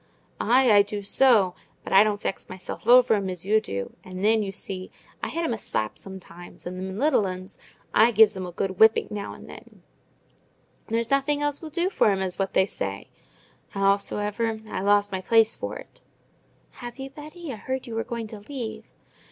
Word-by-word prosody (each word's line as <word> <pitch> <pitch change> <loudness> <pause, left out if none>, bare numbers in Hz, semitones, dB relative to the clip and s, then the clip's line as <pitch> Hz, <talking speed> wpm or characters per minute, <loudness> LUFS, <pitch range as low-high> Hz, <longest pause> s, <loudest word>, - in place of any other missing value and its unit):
"Ay, 250 0 +4
I 205 -1 +8
do 205 0 -4
so! 205 -4 +4 0.3
But - - -5
I 195 +2 +8
don't 210 -1 -1
vex - - -4
myself 185 0 -8
o'er 245 -1 +7
'em 200 -3 0
as 180 -1 -6
you 215 +2 +3
do. 100 - -5
And 185 +1 -5
then, 220 0 +4
you 200 -2 -3
see, 185 -1 -6 0.3
I - - -3
hit 335 - -2
'em 285 - 0
a 225 - -4
slap 110 - -2
sometimes: 175 -2 -10
and 180 +1 -5
them 190 +1 -5
little 265 -6 +2
'uns—I 185 +2 -1
gives 220 -2 +5
'em 185 -1 -4
a - - -7
good 190 +1 -3
whipping 220 0 +5
now 205 -1 -5
and - - -13
then: - - -14 1.0
there's 230 +1 -1
nothing 285 +1 +2
else 290 -1 -1
will 320 - -7
do 345 +4 -1
for 220 - +3
'em, 195 -1 +1
as 185 0 -4
what 195 0 -1
they 190 - +5
say. 100 - -5 0.6
Howsoever, 205 +3 0
I've 190 - -3
lost 205 0 +3
my 190 -1 -3
place 225 +3 +4
for - - -5
it." - - -14 0.8
"Have 240 +1 -7
you, 270 0 -7
Betty? 305 +1 -8
I - - -7
heard 260 +4 -4
you 235 - -7
were 225 0 -1
going 235 -1 -5
to 215 - -8
leave." 240 +1 -6
210 Hz, 200 wpm, -25 LUFS, 190-240 Hz, 1.0 s, I